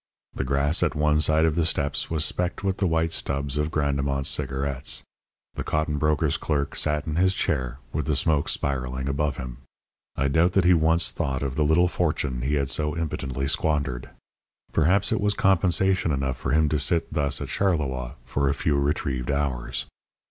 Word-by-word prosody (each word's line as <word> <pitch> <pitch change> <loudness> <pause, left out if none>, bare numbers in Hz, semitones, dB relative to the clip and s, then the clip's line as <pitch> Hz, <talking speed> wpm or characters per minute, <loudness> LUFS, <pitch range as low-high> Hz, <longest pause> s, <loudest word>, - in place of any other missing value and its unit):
The - - -3
grass 70 +4 +1
at 75 - +1
one 75 0 +2
side 80 +1 +3
of 80 - +2
the 85 +1 +1
steps 70 -3 0
was 80 -2 +1
specked 90 +2 -1
with 95 -1 0
the 95 - +1
white 80 0 +1
stubs 70 -3 -2
of 75 +1 0
Grandemont's 70 -2 0
cigarettes. 70 0 -1 0.5
The - - -4
cotton 75 -1 -1
broker's 75 -2 +1
clerk 70 -3 -2
sat 75 0 0
in 80 0 -3
his 95 +2 +3
chair 65 -7 -1 0.2
with 75 0 -2
the 75 - +1
smoke 75 +1 +1
spiralling 65 -1 -2
above 70 +1 -1
him. 65 -1 -7 0.6
I 70 - 0
doubt 80 +6 +2
that 95 - +3
he 90 - +6
once 80 +1 +3
thought 65 0 -2
of 70 -2 -2
the 75 - +2
little 80 +4 +4
fortune 75 -7 -1
he 70 +4 0
had 70 -2 -1
so 75 0 -1
impotently 70 -5 -3
squandered. 70 -6 -1 0.6
Perhaps 95 +6 +2
it 110 - +1
was 105 0 +2
compensation 95 -1 +2
enough 65 -2 -1
for - - -4
him 80 0 +3
to 75 0 0
sit 80 +4 0
thus 70 -2 +1
at - - -5
Charleroi 70 -10 -1
for 70 -1 0
a 70 - 0
few 70 -2 0
retrieved 70 -3 -1
hours. 65 -3 -1
75 Hz, 185 wpm, -25 LUFS, 70-80 Hz, 0.6 s, he